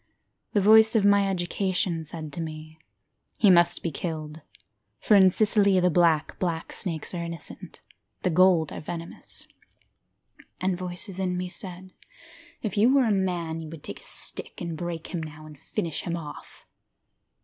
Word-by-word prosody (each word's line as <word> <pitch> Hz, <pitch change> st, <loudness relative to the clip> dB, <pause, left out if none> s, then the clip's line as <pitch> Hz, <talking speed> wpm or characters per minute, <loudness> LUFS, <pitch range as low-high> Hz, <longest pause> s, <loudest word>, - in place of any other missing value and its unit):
The 205 Hz, -, +3 dB
voice 220 Hz, +2 st, +6 dB
of 210 Hz, -3 st, +3 dB
my 200 Hz, -1 st, +4 dB
education 180 Hz, -2 st, -1 dB
said 155 Hz, -1 st, -5 dB
to 170 Hz, -, -4 dB
me 155 Hz, 0 st, -8 dB, 0.6 s
He 205 Hz, -, +6 dB
must 175 Hz, -1 st, +4 dB
be 170 Hz, -, -1 dB
killed, 155 Hz, 0 st, -5 dB, 0.6 s
For -, -, +2 dB
in 190 Hz, -2 st, +8 dB
Sicily 200 Hz, -1 st, +3 dB
the 180 Hz, 0 st, +3 dB
black, 160 Hz, -2 st, +2 dB
black 170 Hz, -3 st, -2 dB
snakes 165 Hz, -4 st, -2 dB
are 170 Hz, -1 st, -3 dB
innocent, 170 Hz, -2 st, -9 dB, 0.4 s
the 180 Hz, -, +1 dB
gold 175 Hz, -2 st, +4 dB
are -, -, -6 dB
venomous. 170 Hz, +1 st, -7 dB, 1.1 s
And 185 Hz, 0 st, 0 dB
voices 180 Hz, +2 st, -6 dB
in 180 Hz, -1 st, -1 dB
me 180 Hz, 0 st, -3 dB
said, 185 Hz, 0 st, -4 dB, 0.7 s
If 210 Hz, -3 st, -3 dB
you 225 Hz, +5 st, +5 dB
were 270 Hz, -2 st, +4 dB
a 220 Hz, -, +2 dB
man 175 Hz, -4 st, -1 dB
You 160 Hz, -, -8 dB
would 160 Hz, -2 st, -10 dB
take -, -, -6 dB
a -, -, -14 dB
stick -, -, 0 dB
and 170 Hz, -2 st, -4 dB
break 170 Hz, +1 st, -6 dB
him 170 Hz, -, -2 dB
now, 155 Hz, 0 st, -9 dB
and 150 Hz, -2 st, -13 dB
finish 165 Hz, +1 st, -4 dB
him 170 Hz, 0 st, -3 dB
off. 150 Hz, -3 st, -10 dB
175 Hz, 165 wpm, -26 LUFS, 160-190 Hz, 1.1 s, in